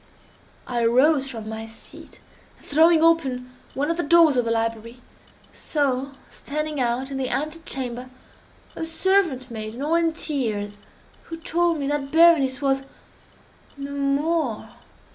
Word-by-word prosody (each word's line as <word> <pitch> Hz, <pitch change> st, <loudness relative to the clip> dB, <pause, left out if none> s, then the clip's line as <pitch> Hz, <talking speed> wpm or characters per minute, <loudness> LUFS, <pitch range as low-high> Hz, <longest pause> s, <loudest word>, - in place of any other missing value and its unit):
I 240 Hz, -2 st, -1 dB
arose 270 Hz, +4 st, +3 dB
from 225 Hz, -4 st, -7 dB
my 220 Hz, 0 st, -6 dB
seat, 225 Hz, -, -12 dB, 0.4 s
and -, -, -20 dB
throwing 320 Hz, +2 st, +4 dB
open 265 Hz, -7 st, +2 dB, 0.2 s
one 290 Hz, +4 st, 0 dB
of 335 Hz, -, -2 dB
the -, -, +1 dB
doors 325 Hz, -1 st, +5 dB
of 245 Hz, -2 st, +1 dB
the -, -, -1 dB
library, 230 Hz, +1 st, -2 dB, 0.5 s
saw 275 Hz, -2 st, -1 dB
standing 305 Hz, 0 st, -4 dB
out 250 Hz, +3 st, -1 dB
in 270 Hz, -, -3 dB
the 260 Hz, -1 st, -2 dB
ante 310 Hz, +3 st, -2 dB
chamber 250 Hz, -1 st, -5 dB, 0.7 s
a -, -, -5 dB
servant 325 Hz, -6 st, +1 dB
maiden, 220 Hz, +3 st, -6 dB
all 305 Hz, +3 st, 0 dB
in 335 Hz, -1 st, +3 dB
tears, 225 Hz, -11 st, -2 dB, 0.5 s
who 330 Hz, -, -7 dB
told 335 Hz, +1 st, 0 dB
me 285 Hz, -, -3 dB
that 285 Hz, -1 st, -2 dB
Berenice 310 Hz, -5 st, +5 dB
was—no 275 Hz, +1 st, -6 dB
more! 280 Hz, -2 st, -1 dB
275 Hz, 140 wpm, -23 LUFS, 250-320 Hz, 0.7 s, doors